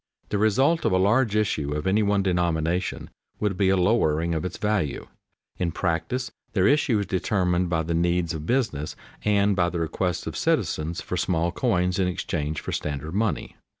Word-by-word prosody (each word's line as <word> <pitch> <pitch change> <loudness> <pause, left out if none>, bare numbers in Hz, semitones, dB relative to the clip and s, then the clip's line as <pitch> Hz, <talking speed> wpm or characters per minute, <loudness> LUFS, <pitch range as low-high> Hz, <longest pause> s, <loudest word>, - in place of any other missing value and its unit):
The 105 - 0
result 135 +10 +3
of - - +2
a - - +4
large 105 +4 +3
issue 75 -9 0
of 75 - -3
any 100 +3 +3
one 100 -1 +2
denomination 85 -1 -1 0.3
would 105 -3 0
be 95 0 +2
a 95 - +3
lowering 85 -4 +2
of 80 - -1
its 90 - -4
value. 105 -9 -1 0.5
In 85 -2 0
practice 90 +10 -2 0.2
their 95 -4 +3
issue 140 -5 +3
is 100 - -1
determined 90 -1 0
by 80 -1 +1
the 85 +1 -2
needs 85 0 +1
of 80 0 -6
business 110 - -1 0.3
and 100 -1 +3
by 85 -2 +2
the 85 - -3
requests 85 +2 -2
of - - -5
citizens 80 +2 0
for 90 - -4
small 85 0 0
coins 90 -4 0
in 95 - +2
exchange 80 -4 -2
for - - -5
standard 75 +2 -3
money. 105 +1 -1
90 Hz, 185 wpm, -25 LUFS, 85-105 Hz, 0.5 s, a